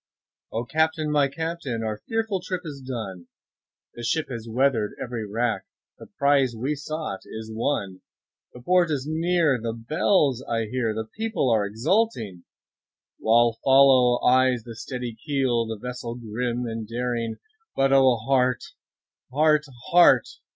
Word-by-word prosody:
O 115 +2 -3
CAPTAIN! 155 +2 0
my 145 -2 +3
Captain! 140 -5 -4
our 110 -1 -4
fearful 220 -4 -1
trip 185 0 -4
is 145 -3 -7
done, 110 -9 -6 0.7
The 120 - -9
ship 155 +6 -1
has 115 -3 -6
weather'd 120 -3 +1
every 115 -3 -4
rack, 115 +2 -1 0.3
the - - -11
prize 140 -4 +3
we 130 +7 -1
sought 155 -7 -5
is 110 0 -8
won, 105 -6 -2 0.5
The 125 - -11
port 180 +2 +3
is 140 -3 -2
near, 160 -3 +1
the 115 0 -3
bells 135 - +1
I 115 -1 0
hear, 115 -1 -2
the 110 0 -3
people 220 - -1
all 110 - +3
exulting, 110 - -1 0.7
While 115 0 +3
follow 130 -2 +6
eyes 130 -2 +3
the 115 -1 -9
steady 125 +1 -5
keel, 130 -6 0
the 110 -1 -4
vessel 125 +1 -6
grim 120 +1 -3
and 115 -2 -5
daring; 115 -1 -2 0.4
But 135 0 +3
O 130 -2 +5
heart! 125 +2 +1 0.7
heart! 150 +2 +3 0.3
heart! 170 -9 +6
125 Hz, 145 wpm, -25 LUFS, 115-145 Hz, 0.7 s, follow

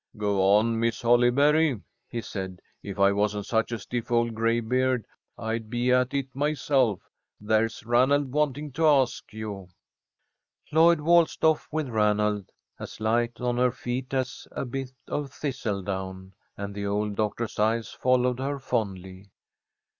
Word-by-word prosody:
"Go 100 -2 0
on, 115 +2 +2
Miss 115 +1 -1
Holly 120 +1 +5
berry," 145 0 +3 0.3
he 120 - -3
said. 95 -4 -6 0.2
"If 100 -1 -7
I 100 0 +5
wasn't 105 0 0
such 110 +1 0
a 120 - -1
stiff 115 +3 -5
old 115 -1 +2
graybeard, 115 +2 +1 0.3
I'd 110 0 -3
be 120 +1 0
at 125 +2 +2
it 135 -2 -3
myself. 135 -6 +1 0.4
There's 110 +1 0
Ranald 130 +4 +3
wanting 150 0 -1
to 160 +4 +2
ask 135 -4 +2
you." 105 -4 -7 1.0
Lloyd 165 0 +5
waltzed 170 +1 +3
off 160 -1 +3
with 155 -2 -1
Ranald, 105 -3 +1 0.3
as - - -8
light 115 +2 0
on 125 -1 -1
her 125 0 +4
feet 125 +1 -4
as 130 -1 -3
a - - -3
bit 130 +1 -5 0.2
of 145 -2 -3
thistle 125 -9 -3
down, 95 0 -5 0.2
and 100 0 -5
the 100 0 -4
old 105 +1 -1
doctor's 110 +1 -2
eyes 110 +1 +1
followed 125 0 +1
her 140 +2 -2
fondly. 100 -7 -4
120 Hz, 150 wpm, -26 LUFS, 105-130 Hz, 1.0 s, Holly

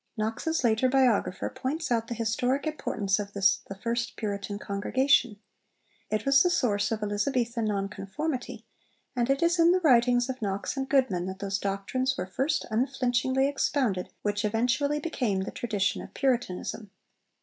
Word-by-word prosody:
Knox's 225 +9 -1
later 235 +2 +3
biographer 250 -8 +2
points 295 +2 -3
out 230 -1 +1
the 235 - -4
historic 245 +5 0
importance 210 -10 -1
of 200 -1 -5
this 195 -1 +3
'the 195 - -5
first 230 +3 -2
Puritan 200 -1 -4
congregation.' 225 +3 +1 0.7
It 215 0 -1
was 275 0 +6
the 355 - +4
source 215 - +1
of 215 -1 -2
Elizabethan 230 +2 0
Non 200 -2 0
conformity, 240 +8 -5 0.5
and 240 0 0
'it 275 +3 +2
is 340 +1 +2
in 335 +1 +6
the 370 - +3
writings 245 -4 +4
of 260 -1 -5
Knox 200 +1 -2
and 270 -1 -3
Goodman 235 -11 +2
that 190 0 -5
those 195 0 -2
doctrines 200 +8 -1
were 180 - -2
first 265 - -1
unflinchingly 260 +2 +1
expounded 260 -9 0
which 205 +1 -1
eventually 245 +7 +1
became 245 - -1
the 190 - -4
tradition 205 -5 -1
of - - -12
Puritanism.' 240 -5 -1
235 Hz, 160 wpm, -28 LUFS, 205-270 Hz, 0.7 s, was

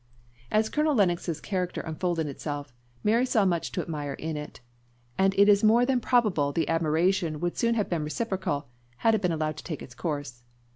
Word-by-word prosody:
As 215 +1 +2
Colonel 300 +3 +1
Lennox's 175 -6 +1
character 180 -1 -2
unfolded 165 +1 -2
itself, 145 -1 -5 0.3
Mary 230 +4 +3
saw 225 -5 +2
much 170 -3 0
to - - -1
admire 145 -3 -4
in 160 +3 -4
it; 150 0 -7 0.6
and 195 0 +2
it 200 +1 +6
is 205 0 +5
more 230 +3 +5
than 260 -1 +2
probable 215 - +2
the 160 +3 0
admiration 165 0 +1
would 175 +1 -2
soon 235 0 +1
have 210 -3 0
been 165 -3 -1
reciprocal, 185 - -2 0.4
had 225 - +6
it 220 - +1
been 180 -3 +1
allowed 155 -1 -2
to - - -8
take 155 -5 -5
its 125 - -11
course. 145 -3 -4
175 Hz, 190 wpm, -27 LUFS, 155-210 Hz, 0.6 s, it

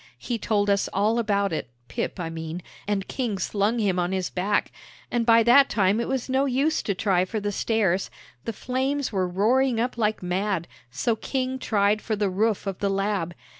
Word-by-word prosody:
He 230 - -3
told 205 -1 +1
us 200 0 +2
all 215 +4 +2
about 200 -4 +1
it, 155 - -3 0.2
Pip, - - -4
I 165 -2 -3
mean, 165 +1 -6 0.2
and 200 -2 -1
King 235 -7 -2
slung 205 +5 0
him 195 -5 +1
on 175 +1 0
his 185 -1 -2
back, 200 +3 0 0.4
and 240 -1 0
by 230 0 +6
that 260 +4 +6
time 200 0 +2
it 235 - -1
was 265 -2 -2
no 265 +1 +2
use 280 +4 +1
to 200 - -2
try 185 -2 +2
for 215 +4 -3
the 205 0 -2
stairs; 200 -3 +1 0.4
the 230 - -1
flames 260 +4 -2
were 190 -3 0
roaring 230 +7 +2
up 240 +1 -1
like 215 -3 0
mad, 180 -1 -1 0.2
so 130 - 0
King 260 +3 -2
tried 210 -3 +2
for 220 - -2
the 205 -2 0
roof 210 +2 0
of 195 -2 -4
the 200 - 0
'Lab.' 195 -3 -1
205 Hz, 200 wpm, -25 LUFS, 190-235 Hz, 0.4 s, by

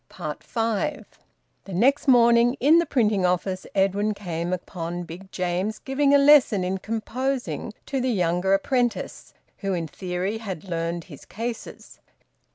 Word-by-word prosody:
FIVE. 225 - -3 0.6
The 195 - -6
next 270 +10 +2
morning, 235 -1 +5
in 305 +6 +6
the 340 - 0
printing 215 -8 +2
office, 185 +1 -1
Edwin 200 +2 +1
came 175 -3 -4
upon 175 -1 -4
Big 180 +3 -11
James 185 +4 -2
giving 275 +1 +1
a 285 - +7
lesson 280 -9 +5
in 190 +1 -2
composing 240 +4 -3
to 270 -2 -2
the 255 - 0
younger 180 -2 +2
apprentice, 240 +4 -2 0.2
who 195 -2 -1
in 165 -2 -3
theory 185 +6 -3
had 195 -7 -6
`learned 170 -2 -3
his 150 -6 -13
cases.' 230 +2 -7
200 Hz, 140 wpm, -24 LUFS, 180-245 Hz, 0.6 s, a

